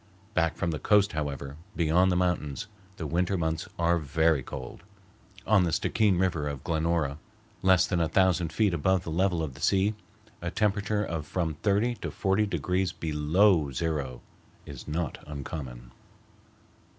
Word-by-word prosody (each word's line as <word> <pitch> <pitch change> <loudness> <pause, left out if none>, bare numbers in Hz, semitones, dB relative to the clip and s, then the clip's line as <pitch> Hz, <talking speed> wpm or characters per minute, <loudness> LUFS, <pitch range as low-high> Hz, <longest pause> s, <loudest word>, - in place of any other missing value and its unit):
Back 80 -3 +1
from 85 - -1
the 75 - -3
coast, 105 -1 +3
however, 70 -2 -4 0.2
beyond 90 +3 +3
the - - +1
mountains, 90 -5 -1 0.3
the 80 - -4
winter 90 +5 0
months 80 -1 -2
are 85 0 +2
very 80 0 +2
cold. 65 +2 -8 0.6
On 105 -4 +4
the 85 - 0
Stickeen 105 +3 +2
River 85 -5 0
at 70 -2 -6
Glenora, 80 -3 0 0.4
less 95 -2 +5
than 90 - -1
a 80 -2 +1
thousand 90 -1 +2
feet 100 +2 +2
above 90 +3 +1
the 80 - -5
level 90 0 +1
of 70 -4 -4
the - - -13
sea, 100 +2 +2 0.5
a 85 - -2
temperature 105 +1 0
of 80 -6 -4
from 85 -2 -1
thirty 105 +8 +1
to - - -5
forty 100 +2 +1
degrees 90 +1 0
below 80 +1 +2
zero 70 -3 -2 0.4
is 70 -3 -9
not 80 +1 -3
uncommon. 65 -4 -7
85 Hz, 155 wpm, -28 LUFS, 75-95 Hz, 0.6 s, less